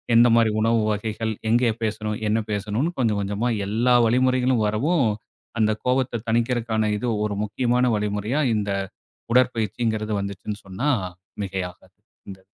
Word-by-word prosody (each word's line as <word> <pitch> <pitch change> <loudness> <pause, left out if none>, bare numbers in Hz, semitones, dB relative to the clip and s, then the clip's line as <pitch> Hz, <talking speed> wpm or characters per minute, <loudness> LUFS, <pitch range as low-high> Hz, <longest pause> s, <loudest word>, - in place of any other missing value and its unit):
எந்த 120 +1 +7
மாதிரி 115 -2 +4
உணவு 115 0 +3
வகைகள், 110 +1 -2 0.2
எங்கே 120 0 +3
பேசணும், 105 0 -2
என்ன 110 +1 +2
பேசணும்னு, 105 - -1
கொஞ்சம் 110 -4 +1
கொஞ்சமா 105 +5 -1 0.2
எல்லா 120 +4 +2
வழிமுறைகளும் 125 0 +2
வரவும், 135 +5 +1 0.5
அந்த 110 0 +3
கோபத்தை 125 -2 +1
தணிக்கிறதுக்கான 115 -2 +1
இது 125 - -3 0.2
ஒரு 105 -1 -2
முக்கியமான 125 +4 +1
வழிமுறையா 105 +7 -1
இந்த 105 -1 -1 0.6
உடற்பயிற்சிங்கறது 110 -3 +1
வந்துச்சுன்னு 100 +1 -5
சொன்னா 95 +10 -2 0.5
மிகையாகாது. 95 -2 -6 0.3
இந்த 95 - -9
110 Hz, 125 wpm, -23 LUFS, 105-125 Hz, 0.6 s, எந்த